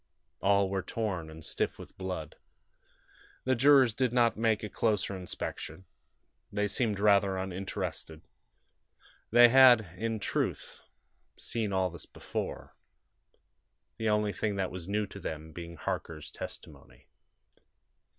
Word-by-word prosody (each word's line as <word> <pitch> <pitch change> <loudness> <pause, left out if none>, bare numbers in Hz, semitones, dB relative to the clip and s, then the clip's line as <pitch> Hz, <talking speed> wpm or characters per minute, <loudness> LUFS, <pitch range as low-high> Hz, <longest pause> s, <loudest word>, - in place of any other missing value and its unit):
All 100 0 +3
were 95 0 -1
torn, 95 -7 -3
and 80 0 -10
stiff - - -1
with - - -12
blood. 90 -5 -5 1.1
The 130 - +2
jurors 130 -1 +6
did 130 0 0
not 120 -1 +3
make 110 -1 +1
a - - -2
closer 105 -3 0
inspection. 90 -1 -6 0.7
They 105 0 0
seemed 105 -1 0
rather 100 -2 +4
uninterested. 95 -4 -5 1.1
They 120 +1 +8
had, 120 -8 +7
in 115 +3 -2
truth, - - -2 0.6
seen 110 -3 -3
all 95 -2 +1
this 85 - -9
before; - - -6 1.2
the 110 -1 0
only 105 -1 +1
thing 105 -2 -1
that 95 -2 -1
was 90 0 -5
new 105 +1 0
to 100 0 -10
them 80 -3 -6
being 85 0 -8
Harker's 80 0 -5
testimony. - - -10
100 Hz, 125 wpm, -30 LUFS, 90-110 Hz, 1.2 s, They